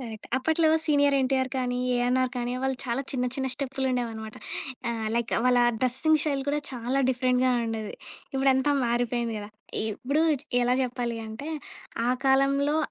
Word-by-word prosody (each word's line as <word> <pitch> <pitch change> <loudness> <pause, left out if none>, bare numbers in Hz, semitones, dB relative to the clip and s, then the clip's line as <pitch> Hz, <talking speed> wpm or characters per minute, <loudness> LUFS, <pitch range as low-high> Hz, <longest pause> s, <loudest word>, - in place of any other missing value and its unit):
Correct. 225 -4 -8
అప్పట్లో 320 +4 +2 0.2
'senior 285 -2 +3
NTR' 260 0 +1
కానీ, 250 -1 -1 0.2
'ఏఎన్ఆర్' 250 +1 +2
కానీ, 245 0 -2
వాళ్ళు 265 0 0
చాలా 245 +1 -1
చిన్న 250 -2 0
చిన్న 265 -1 -1
స్టెప్పులు 270 -1 -2
ఉండేవి 245 -2 0
అనమాట. 220 -1 -8 0.8
లైక్ 235 0 -1
వాళ్ళ 250 -1 +4 0.2
డ్రెస్సింగ్ 265 +5 +3
స్టైల్ 280 -3 0
కూడా 290 +1 +1
చాలా 250 +1 -2
డిఫరెంట్‌గా 255 0 +2 0.2
ఉండేది. 220 -2 -4 0.4
ఇప్పుడు 270 0 +3
అంతా 265 +2 +2
మారిపోయింది 240 -1 0
గదా! 205 0 -7 0.4
ఇప్పుడు 280 +8 0 0.4
ఎలా 245 +1 +3
చెప్పాలి 240 -2 -2
అంటే, 220 +7 -7 0.6
ఆ - - +3
కాలంలో 275 +2 +3
255 Hz, 150 wpm, -27 LUFS, 240-275 Hz, 0.8 s, వాళ్ళ